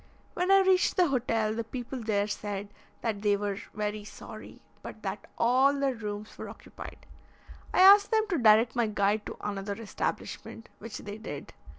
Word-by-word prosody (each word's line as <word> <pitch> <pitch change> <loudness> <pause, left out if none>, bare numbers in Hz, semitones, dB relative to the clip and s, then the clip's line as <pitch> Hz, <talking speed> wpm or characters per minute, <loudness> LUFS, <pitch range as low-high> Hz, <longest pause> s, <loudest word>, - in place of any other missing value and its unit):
When 360 +1 -1
I 390 0 +7
reached 380 0 +3
the 355 -3 +4
hotel, 225 -4 0
the 230 +1 -2
people 245 +2 -6
there 205 -2 +1
said 205 -1 -4 0.3
that 215 -3 -2
they 205 -1 +3
were 200 -1 -3 0.2
very 210 0 -2
sorry, 210 - -11 0.2
but - - -10
that - - -5
all 260 +4 +4
their 275 -1 +1
rooms 210 -2 -6
were - - -6
occupied. - - -11 0.7
I - - +3
asked 400 +2 +8
them 440 -1 +2
to 345 -6 +1
direct 225 +1 +5
my 235 -2 +2
guide 210 0 0
to - - -7
another 200 0 -4
establishment, 225 +1 -5
which 225 0 -7
they 205 +1 -8
did. 145 -10 -7
220 Hz, 175 wpm, -29 LUFS, 205-265 Hz, 0.7 s, asked